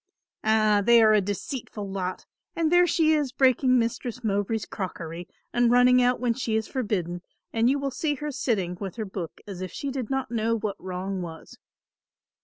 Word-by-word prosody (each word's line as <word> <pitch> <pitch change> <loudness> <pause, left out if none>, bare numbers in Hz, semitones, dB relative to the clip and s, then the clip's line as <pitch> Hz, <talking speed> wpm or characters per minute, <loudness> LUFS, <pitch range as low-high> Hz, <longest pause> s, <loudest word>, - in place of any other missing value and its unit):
"Ah, 215 -1 +3
they 235 +2 +6
are 215 0 +6
a 210 - +5
deceitful 210 - -5
lot, 185 -1 -4 0.3
and 330 -1 +1
there 355 0 +6
she 315 -2 +3
is 295 -4 0
breaking 255 -1 +3
Mistress 240 +1 -2
Mowbray's 205 +1 -1
crockery 175 -3 -6 0.3
and 240 -1 +3
running 250 +1 +5
out 250 0 +2
when 245 -2 +1
she 225 -2 -2
is 220 -1 0
forbidden 185 - -2 0.3
and 230 +1 +3
you 275 - +2
will 275 -1 -2
see 295 +1 -1
her 295 +2 -4
sitting 195 -10 -1
with 195 -2 -5
her 220 -2 -3
book 190 -4 -7
as 195 -3 -7
if 185 - -5
she 280 - -4
did 255 -4 -4
not 265 -3 -2
know 230 0 +1
what 210 -2 -4
wrong 185 +1 -4
was." 165 -2 -9
225 Hz, 190 wpm, -26 LUFS, 195-255 Hz, 0.3 s, they